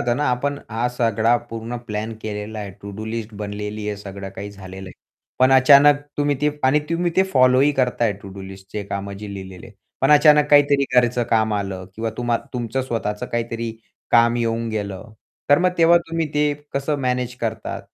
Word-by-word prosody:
होतं 120 0 0
ना, 150 - 0
आपण 145 +3 -3
हा 115 +2 0
सगळा 115 0 +2
पूर्ण 115 +1 -5
प्लॅन 105 +2 -4
केलेला 105 0 -5
आहे. 100 -2 -5
तो 95 - -18
टू 100 - -7
डू 110 - -5
लिस्टच 110 -2 -5
बनलेली 105 0 -5
आहे, 105 - -3
सगळं 100 -1 -8
काही 100 +1 -6
झालेलं 95 -1 -10
आहे. - - -11 0.5
पण 130 +1 +5
अचानक 140 +2 +7 0.2
तुम्ही 145 -1 +1
ते 150 - +2
आणि 145 +3 +4
तुम्ही 170 +1 0
ते 190 - +6
फॉलो 130 0 +5
ही 145 +1 +4
करताय 120 -4 +1
टू 100 - -9
डू 95 - -8
लिस्टच 95 +1 -8
कामं 100 0 -4
जे 105 -1 -6
लिहिलेली 95 -2 -9
आहेत. 100 - -17 0.2
पण 135 - +3
अचानक 150 0 +6
काहीतरी 145 -1 +5
घरचं 120 0 +3
काम 110 -1 +2
आलं 95 -2 -3
किंवा 110 +1 -3
तुम्हा 120 -1 0 0.2
तुमचं 125 +1 -2
स्वतःच 110 -3 -3
काहीतरी 115 0 -2 0.4
काम 115 0 +5
येऊन 115 0 -1
गेलं. 105 0 -5 0.4
तर 145 - +7
मग 180 0 +3
तेव्हा 170 +1 +6
तुम्ही 165 -1 0
ते 150 0 +2 0.2
कसं 140 +2 0
मॅनेज 125 -1 -1
करतात? 110 -1 -3
115 Hz, 195 wpm, -21 LUFS, 105-135 Hz, 0.5 s, अचानक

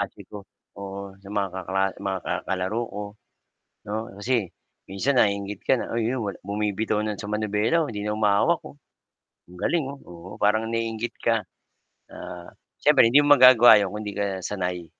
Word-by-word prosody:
Ate 100 0 -5
ko, 105 - -8 0.4
oo. 100 0 -7
Sa 100 - -13
mga 100 -1 -1
kakla 95 +1 -2 0.2
mga 95 -1 -2
ka - - -2 0.2
kalaro 95 +5 -1
ko, 105 - -5 0.9
no? 110 +2 -3
Kasi 110 -1 -1 0.4
minsan 115 +8 -1
naiinggit 100 -1 0
ka - - +6
na - - -5
uy 115 -1 0
'yon 125 -2 -2 0.2
bumibitaw 105 +1 -1
na 105 -2 -3
sa 105 - -7
manibela, 105 +9 +1
oh, - - -5
'di 105 -1 -5
na 105 0 -1
humahawak, 105 +11 +2
oh. 155 - -11 0.7
Ang 90 +1 -14
galing 165 -4 +1
oh, 140 0 -9
oo, 85 +1 -12
parang 110 +2 +2
naiinggit 115 0 -3
ka. 115 -3 +1 0.7
Ah, 85 -1 -9 0.3
siyempre 115 - +5
hindi 140 - +6
mo 145 - +7
magagawa 125 -5 +8
'yon 100 - -1
kung 105 - -5
'di 105 - -5
ka 100 0 -1 0.2
sanay. 90 -3 -3
105 Hz, 175 wpm, -24 LUFS, 100-115 Hz, 0.9 s, magagawa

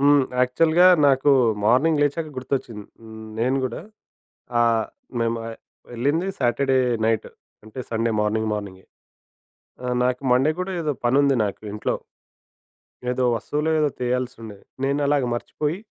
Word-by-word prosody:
హ్మ్. 145 0 +5 0.2
యాక్చువల్‌గా 160 +8 +4 0.2
నాకు 135 +1 +4 0.3
మార్నింగ్ 145 +8 +3
లేచాక 150 +2 0
గుర్తొచ్చింది. 125 -5 -4 0.5
నేను 125 +4 +1
గూడా 130 +4 -4 0.8
ఆహ్, 115 -1 +2 0.3
మేము 115 0 0 0.5
వెళ్ళింది 145 +10 0
సాటర్‌ 125 +2 0
డే 130 - +4 0.3
నైట్ 110 -1 0 0.4
అంటే 110 +4 -8
సండే 115 0 0
మార్నింగ్ 110 +1 0
మార్నింగే. 100 -3 -6 1.0
ఆహ్, 125 0 -1
నాకు 125 +1 -1
మండే 135 +5 +3
కూడా 190 +1 -3
ఏదో 155 -2 -1
పనుంది 130 +4 +4
ఉంది 140 -2 +3
నాకు 100 +1 -5
ఇంట్లో. 105 - -2 1.2
ఏదో 125 0 -1
వస్తువులో, 150 +7 -2
ఏదో 150 -1 +2
తెయాల్సుండేది. 120 -4 -4 0.2
నేనలాగే 140 -1 +1
మర్చిపోయి 150 +7 -3
125 Hz, 125 wpm, -23 LUFS, 115-145 Hz, 1.2 s, హ్మ్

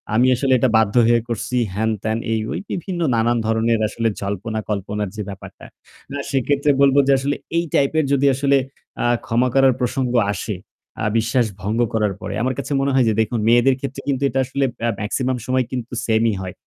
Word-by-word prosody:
আমি 125 +3 +4
আসলে 130 +1 +1
এটা 130 - +3
বাধ্য 110 -1 +1
হয়ে 120 0 +4
করছি।" 120 +2 -2 0.2
হেন-তেন 110 0 -1
এই 110 - +1
ওই - - -2
বিভিন্ন 175 0 -4
নানান 115 +1 +2
ধরনের 110 0 +1
আসলে 115 +2 -2
জল্পনা 100 +2 -3
কল্পনার 105 0 -2
যে 110 - -4
ব্যাপারটা। 100 -1 -10 0.5
না, 140 - -4
সেক্ষেত্রে 140 +2 +2
বলব 140 -1 +5
যে - - +4
আসলে 140 +2 -1 0.2
এই 170 - +2
type 140 +1 +2
এর 155 - +2
যদি 140 0 +2
আসলে 140 +1 +3 0.5
আ - - +1 0.2
ক্ষমা 120 +3 +1
করার 135 -1 +5
প্রসঙ্গ 125 0 -1 0.2
আসে, 105 0 -4 0.5
আ - - 0
বিশ্বাস 115 +2 +2 0.2
ভঙ্গ 105 +4 -2
করার 105 -3 +1
পরে। 100 +1 -5
আমার 130 +1 0
কাছে - - -5
মনে 140 0 +1
হয় 130 -2 +4
যে - - +2
দেখুন, 110 +2 -1
মেয়েদের 120 +3 +4
ক্ষেত্রে 140 0 -5
কিন্তু 140 -1 0
এটা 135 - -1
আসলে 135 +2 -1 0.2
আ - - +2
maximum 125 +4 -1
সময় 130 0 +1
কিন্তু 125 -1 -5
same-ই 110 0 +2
হয়। 90 -1 -6
120 Hz, 195 wpm, -20 LUFS, 110-135 Hz, 0.5 s, বলব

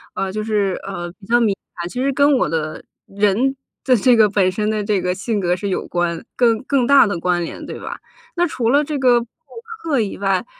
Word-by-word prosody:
呃， 195 - -2
就 215 +2 -3
是， 205 -3 0
呃， 175 -3 -5
比 200 - -14
较 240 +2 +3
敏 215 -4 +2 0.2
感。 170 0 -5
其 250 - -4
实 275 +1 +1
跟 285 +2 +4
我 - - +1
的 155 0 -3 0.3
人 210 +7 +1 0.3
的 260 - +3
这 245 +4 +4
个 215 -2 +5
本 195 -2 +2
身 210 +3 -1
的 215 -1 -1
这 205 -2 0
个 180 0 0
性 205 +2 -2
格 175 -1 +1
是 185 +3 -3
有 190 - -2
关 175 -1 -2
更 230 -3 +2
更 260 -2 +1
大 280 0 +7
的 200 -5 -2
关 175 0 0
联， 165 - -7
对 - - -7
吧？ - - -7 0.4
那 350 0 +3
除 240 -7 -1
了 285 +4 +3
这 300 0 -3
个 250 -3 +4
上 235 - -6 0.6
课 300 -6 +1
以 210 -3 -2
外 195 -1 0
210 Hz, 250 characters per minute, -19 LUFS, 185-250 Hz, 0.6 s, 大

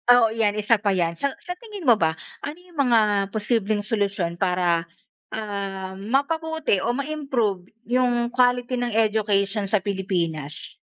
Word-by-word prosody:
oo 235 -2 +5
yan, 220 -2 +1
isa 215 +2 +3
pa 200 -1 +1
yan. 170 -2 0
Sa 280 +5 -1
sa 360 - -5
tingin 420 -6 -9
mo 235 - +8
ba, 160 -1 +2 0.3
ano 300 +4 -6
yung 355 -3 -19
mga 245 -4 +5 0.3
posibleng 215 -1 0
solusyon 200 -6 -1
para, 180 -2 +1 0.5
ah, 195 -3 -4
mapabuti 295 +5 0
o 240 +5 0
ma-improve 260 -11 -2 0.2
yung 245 -1 +2
quality 245 0 +2
ng 245 -2 -2
education 210 -2 +1
sa 195 0 +2
Pilipinas? 175 -7 -3
215 Hz, 145 wpm, -24 LUFS, 195-250 Hz, 0.5 s, mo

